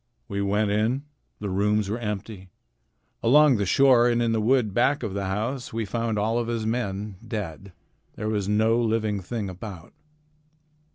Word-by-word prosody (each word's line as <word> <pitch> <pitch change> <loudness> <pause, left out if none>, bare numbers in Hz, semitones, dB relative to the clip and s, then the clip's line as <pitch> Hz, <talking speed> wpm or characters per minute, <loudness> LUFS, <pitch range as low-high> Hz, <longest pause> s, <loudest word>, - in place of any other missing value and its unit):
We 100 0 -3
went 100 +1 +1
in. 110 +6 +1 0.4
The 100 -2 -4
rooms 105 +2 +1
were 110 +4 -2
empty. 105 -3 -5 0.7
Along 140 +2 +5
the 100 -2 -1
shore 125 0 +5
and 120 0 +1
in 115 -1 +1
the 110 -1 +1
wood 115 -2 +2
back 135 +4 +2
of 105 -4 -3
the 100 0 -2
house 110 +7 -3
we 115 -1 -2
found 115 +1 -2
all 110 +3 +1
of 120 - -2
his 115 -2 -2
men, 105 -3 -3
dead. 100 -4 -6 0.4
There 105 - -4
was 105 -2 -1
no 110 +2 +3
living 110 -3 0
thing 105 +2 -4
about." 95 -2 -9
110 Hz, 170 wpm, -25 LUFS, 100-115 Hz, 0.7 s, Along